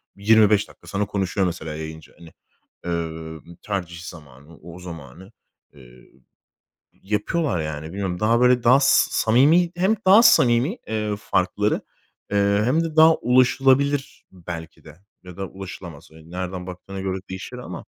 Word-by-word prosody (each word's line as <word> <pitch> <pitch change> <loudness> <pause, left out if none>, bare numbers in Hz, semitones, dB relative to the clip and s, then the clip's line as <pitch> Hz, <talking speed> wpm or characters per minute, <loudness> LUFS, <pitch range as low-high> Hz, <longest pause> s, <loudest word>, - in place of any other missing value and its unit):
25 105 0 +4
dakika - - -19
sana 105 +1 -2
konuşuyor, 95 -1 -1
mesela, 80 -3 -5
yayıncı, 80 0 -9
hani, 85 -1 -14 0.5
eee, 90 - -3
ımm, 80 0 -6
tercih 90 -4 -4
zamanı, 80 -3 -13
o 85 +1 -12
zamanı, 85 - -11 0.4
eee, 60 -3 -18 0.8
yapıyorlar, 105 - -2
yani. 75 0 -5
Bilmiyorum 90 +1 -4
daha, 115 +2 +2
böyle, 125 -1 +4
daha 125 +3 +6
s 135 - +4
samimi 150 +10 +3
hem 190 +5 +2
daha 200 +5 +7
samimi, 130 - +4
eee, 105 -1 -2
farkları, 105 +2 0 0.5
eee, 100 0 +2
hem 155 +8 +1
de 160 -1 -6
daha 160 +1 +7
ulaşılabilir 135 +3 +2
belki 85 -3 -9
de 75 -1 -14 0.3
ya 90 -1 -11
da 95 0 -4
ulaşılamaz. 90 -5 -10
Eee, 80 0 -16
nereden 90 0 -5
baktığına 95 +2 -8
göre 95 0 -3
değişir 95 0 -7
ama, - - -8
95 Hz, 145 wpm, -22 LUFS, 85-120 Hz, 0.8 s, daha